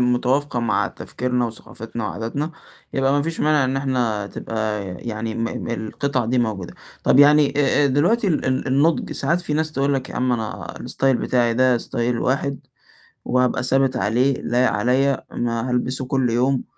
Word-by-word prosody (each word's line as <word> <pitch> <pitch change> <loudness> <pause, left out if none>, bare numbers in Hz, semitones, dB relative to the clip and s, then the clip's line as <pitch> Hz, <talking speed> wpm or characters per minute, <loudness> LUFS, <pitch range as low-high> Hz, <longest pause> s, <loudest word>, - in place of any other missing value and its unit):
متوافقة 125 +2 +1
مع 115 -4 +1
تفكيرنا 125 0 -2
وثقافتنا 115 0 -7
وعاداتنا، 115 +10 -3 0.4
يبقى 135 0 +2
ما 145 - +2
فيش 165 +2 -3
مانع 150 -3 +3
إن 130 +1 -1
إحنا 120 -7 -1
تبقى 110 -1 -3
يعني 110 +2 -5
م 115 - -2
م 115 - -4
القطعة 120 +2 -2
دي 125 +2 +1
موجودة، 110 -6 -2 0.3
طَب - - +4
يعني 145 0 +6
آآ، 145 0 +3
دلوقتي 175 - +2
ال 160 - 0
ال 130 0 0
النُضج 145 +5 +2
ساعات 170 +6 0
في 175 - -3
ناس 155 0 0
تقول 140 -1 +1
لك 130 -1 -3
يا - - -7
عَم 125 0 +1
أنا 110 -3 -4
الستايل 135 -1 +1
بتاعي 120 -1 +1
ده 125 -1 +3
ستايل 120 +1 -2
واحد 140 +2 -1 0.6
وهابقى 125 -1 +1
ثابت 135 0 +2
عليه 125 +6 +2
لايق 125 +2 +2
عليَّ، 130 +6 +1
ما 115 +1 -2
هالبسه 130 +1 -1
كُلّ 130 -2 0
يوم 125 +3 +1
125 Hz, 170 wpm, -21 LUFS, 115-140 Hz, 0.6 s, يعني